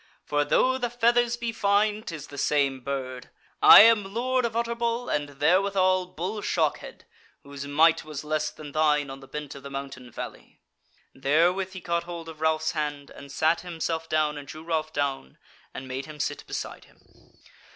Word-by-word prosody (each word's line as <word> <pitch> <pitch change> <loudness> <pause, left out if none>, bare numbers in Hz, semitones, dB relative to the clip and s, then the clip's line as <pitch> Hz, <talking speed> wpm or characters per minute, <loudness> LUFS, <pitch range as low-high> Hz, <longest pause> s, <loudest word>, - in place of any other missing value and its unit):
for 145 0 +1
though 260 - +2
the 245 -1 -1
feathers 240 0 +2
be 235 -1 -3
fine 210 0 +1
'tis 165 -10 -7
the 145 - -11
same 140 -3 +1
bird. 130 -1 -5 0.3
I - - +11
am 210 -2 +4
Lord 255 +1 +1
of 225 -1 -3
Utterbol 235 +1 -1
and 145 -1 -3
therewithal 185 +2 +3
Bull 185 +5 -4
Shockhead, 160 -7 -2 0.4
whose 140 0 -8
might 160 +3 +4
was 155 -2 -7
less 155 0 -1
than 150 -1 -11
thine 150 -2 +2
on 135 - -8
the 135 - -14
bent 150 -1 -6
of 140 - -10
the 140 - -9
mountain 135 -2 -7
valley." - - -9 0.5
Therewith 175 +8 +1
he 185 - -8
caught 170 0 -1
hold 170 -1 -7
of 155 -1 -11
Ralph's 160 0 +1
hand, 145 -3 -4
and 140 0 -12
sat 160 +4 +1
himself 165 -2 -4
down 150 -1 +1
and 140 - -11
drew 155 +2 -9
Ralph 160 -2 -2
down, 135 - -3 0.3
and 130 - -8
made 130 +2 -5
him 155 -1 -10
sit - - -3
beside - - -6
him. - - -26
155 Hz, 180 wpm, -26 LUFS, 145-195 Hz, 0.5 s, I